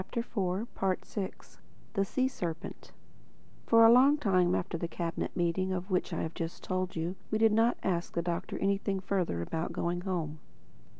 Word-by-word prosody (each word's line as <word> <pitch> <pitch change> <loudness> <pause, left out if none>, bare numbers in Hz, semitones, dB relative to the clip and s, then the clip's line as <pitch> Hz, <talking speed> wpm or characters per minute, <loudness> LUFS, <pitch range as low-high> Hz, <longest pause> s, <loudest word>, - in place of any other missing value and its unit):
THE 235 - 0
FOURTH 195 -1 -2 0.5
CHAPTER 195 -3 -3 0.6
THE 195 -3 +2
SEA 260 +6 +1
SERPENT 175 -9 -5 0.8
FOR 230 0 +7
a 225 - +9
long 270 +5 +6
time 185 -9 +3
after 175 - -2
that 170 - -3
Cabinet 170 -1 -3
Meeting 175 +2 +1
of 185 +1 -3
which 185 +1 0
I 165 - -2
have 160 - -4
just 165 0 -5
told 185 0 -2
you 170 +3 -2
we 215 - +1
did 225 0 +5
not 225 +3 +3
ask 175 -2 -1
the 170 - 0
Doctor 170 -1 -3
anything 195 0 0
further 185 - -1
about 160 - -3
going 175 +1 -1
home. 165 -5 -3
185 Hz, 175 wpm, -31 LUFS, 170-205 Hz, 0.8 s, a